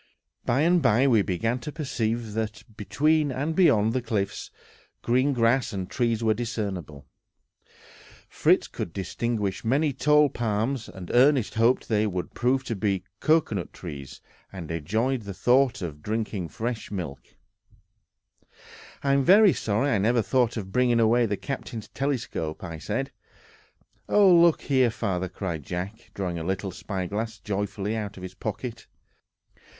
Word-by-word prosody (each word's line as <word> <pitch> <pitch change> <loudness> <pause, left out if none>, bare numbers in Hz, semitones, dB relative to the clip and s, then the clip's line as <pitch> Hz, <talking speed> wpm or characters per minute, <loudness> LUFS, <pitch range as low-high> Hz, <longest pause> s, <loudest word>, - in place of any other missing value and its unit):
By 130 +4 +2
and 175 +2 +4
by 125 0 +4
we 115 -6 +4
began 115 +7 -1
to 150 +5 -6
perceive 115 -7 -2
that, 110 -1 -3
between 145 +9 +1
and 145 +5 -2
beyond 115 - +4
the 130 - 0
cliffs, 105 -4 -3 0.5
green 130 +4 +2
grass 120 -1 +2
and 95 -2 -3
trees 115 -2 0
were 110 -1 +3
discernible. 100 - -4 1.2
Fritz - - +2
could 80 - -6
distinguish 100 -1 -2
many 140 +5 +1
tall 150 +3 +4
palms, 115 0 -2
and 95 -3 -8
Ernest 130 -1 +4
hoped 115 +3 +2
they 110 -1 +2
would 90 -3 -4
prove 130 +2 +1
to 120 -3 -3
be 95 -2 -1 0.2
cocoanut 155 - +1
trees, 70 -5 -9 0.3
and 85 -5 -7
enjoyed 110 - -1
the 100 -3 -7
thought 125 +2 +2
of 75 -4 -6
drinking 105 -1 -2
the - - -18
refreshing 110 -3 -4
milk. 70 -7 -5 1.8
"I 140 -1 +2
am 140 0 +3
very 200 +4 +7
sorry 115 +7 0
I 105 - +2
never 115 +3 +2
thought 125 -1 +1
of 95 -3 -5
bringing 120 +1 +3
away 115 +1 +4
the 100 -1 -2
captain's 125 -4 -6
telescope," 115 - -3
said 135 - -3 1.0
I. - - -4
"Oh, 200 -3 +7
look 170 -1 +5
here, 130 -3 +3
father!" 95 -5 -2
cried 85 -4 -4
Jack, 95 - -6
drawing 90 -4 -3
a - - -4
little 95 +2 -2
spyglass 100 +4 -4
joyfully 100 +1 -3
out 105 -2 -5
of 90 - -9
his 95 - -7
pocket. - - -6
110 Hz, 150 wpm, -26 LUFS, 95-130 Hz, 1.8 s, very